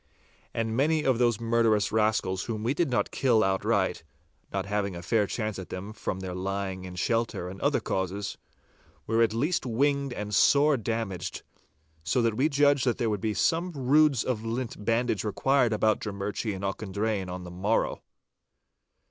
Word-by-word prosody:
And 115 -1 -2
many 155 +4 +2
of 130 -3 +2
those 120 -3 +2
murderous 115 -2 +2
rascals 105 -4 +1
whom 110 -2 -4
we 120 +4 +1
did 165 +1 0
not 125 - 0
kill 120 -5 +3
outright 95 0 0 0.5
(not 95 -1 -2
having 100 -2 -1
a 85 - -7
fair 105 +2 +2
chance 110 -2 -3
at 95 - -8
them 100 +4 -6
from 95 -3 -4
their 95 -1 -5
lying 95 0 -3
in 90 -1 -8
shelter 115 -2 -1
and 95 +1 -8
other - - +2
causes), 95 +2 -3 0.7
were 115 +1 +1
at 115 -2 +4
least 150 +11 0
winged 140 +3 +1
and 105 -3 -5
sore 145 +5 +5
damaged, 115 -5 -3 0.6
so 125 - +1
that 115 -1 +2
we 135 +8 +2
judged 140 -2 +3
that 120 - +2
there 115 -2 0
would 105 -2 -2
be 110 -1 -1
some 170 - +1
roods 140 -1 +3
of 115 -4 -2
lint 115 -1 -4
bandage 115 -1 +1
required 125 +3 +2
about 110 0 +2
Drummurchie 105 +1 -3
and 95 - -7
Auchendrayne 100 0 -2
on 90 0 -6
the 90 - -8
morrow. 100 +5 0
110 Hz, 175 wpm, -28 LUFS, 100-125 Hz, 0.7 s, sore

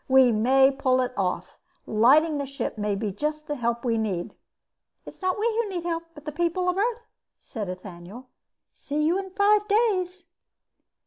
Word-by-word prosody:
We 260 -2 +6
may 265 +5 +4
pull 260 -2 +1
it 250 0 -2
off. 185 -2 -3 0.3
Lighting 290 +8 +4
the 280 - -3
ship 275 +1 -4
may 210 -2 -1
be 205 +1 -2
just 300 +9 -3
the 295 - -3
help 235 -1 -2
we 230 -2 +1
need." 190 -6 -3 0.7
"It's - - -11
not 370 -1 0
we 430 - 0 0.2
who 440 - -5
need 350 -3 -4
help, 335 -1 -2
but 295 - -13
the 300 - -4
people 345 +3 -1
of 360 - 0
Earth," 460 +4 0 0.4
said 210 -7 -6
Ethaniel. 185 +5 -9 0.5
"See 295 +1 -3
you 340 +5 +2
in 385 -1 -6
five 410 +2 +3
days." 380 -5 +1
285 Hz, 180 wpm, -25 LUFS, 230-360 Hz, 0.7 s, We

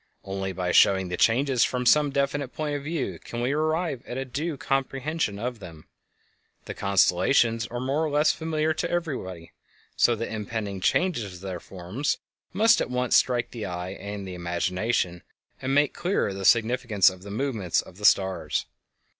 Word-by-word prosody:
Only 95 0 -3
by 90 -1 -2
showing 95 0 +4
the 90 - -2
changes 125 +5 +3
from 125 -1 -1
some 150 +3 +5
definite 140 0 -1
point 150 -1 -2
of 145 - -4
view 155 -1 -3
can 120 - -7
we 125 +2 0
arrive 155 -2 0
at 120 - -5
a 135 - -2
due 145 +4 -3
comprehension 135 -2 -1
of 120 +2 -4
them. 80 -5 -11 0.8
The - - -5
constellations 115 +5 +2
are 120 - -5
more 135 +5 0
or 155 - 0
less 150 +1 +3
familiar 160 -1 -1
to - - -2
everybody, 125 - -4 0.4
so 120 - +4
that 115 0 -4
impending 105 -2 -4
changes 115 - 0
of 90 - -12
their 95 -2 -5
forms 95 - -3 0.3
must 225 +5 +4
at - - -2
once 125 0 +1
strike 125 -2 +2
the 115 -3 -5
eye 90 +1 -5
and 100 0 -6
the 95 - -6
imagination, 90 +2 -1 0.4
and 135 +1 0
make 145 -1 +3
clearer 175 - 0
the 95 0 -5
significance 115 -4 +4
of 95 -1 -13
the 100 - -10
movements 110 -5 -1
of 90 - -7
the 105 - -4
stars. 95 -2 +2
120 Hz, 175 wpm, -26 LUFS, 95-140 Hz, 0.8 s, some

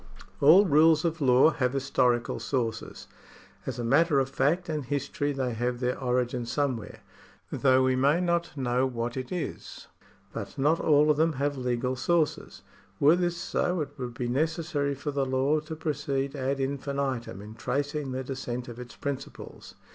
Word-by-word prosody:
All 170 +8 +7
rules 155 0 +4
of 165 -1 -1
law 130 +3 +5
have 125 -4 -1
historical 125 -3 +1
sources. 115 -5 -3 0.6
As - - -3
a 120 - -3
matter 145 +5 +3
of 135 0 0
fact 170 +7 +1
and 155 -3 -2
history 145 +2 -2
they 130 -3 -2
have 120 +2 -2
their 125 0 0
origin 125 -2 -1
somewhere, 125 -4 -2 0.5
though 130 -1 +3
we 130 0 +2
may 140 +6 +3
not 170 -3 -1
know 130 0 +1
what 120 -1 -4
it 130 -1 -5
is. 180 -2 -5 0.5
But - - -7
not 150 +5 +2
all 150 0 +4
of 150 - 0
them 160 +1 +2
have 145 +1 -1
legal 125 0 -1
sources. 155 +4 -1 0.4
Were 150 +4 +6
this 175 -1 -1
so, 180 0 -1
it 145 - -3
would 120 -2 -5
be 120 - -3
necessary 150 +1 -1
for 145 +2 -4
the 140 -1 0
law 135 +3 +1
to 155 +1 -7
proceed 140 -3 -2
ad 135 0 -2
infinitum 135 -5 -3
in 105 +2 -10
tracing 140 +4 -2
the 130 +1 -3
descent 125 -1 -5
of 120 0 -9
its 125 -1 -9
principles. 140 -1 -7
135 Hz, 170 wpm, -27 LUFS, 125-150 Hz, 0.6 s, All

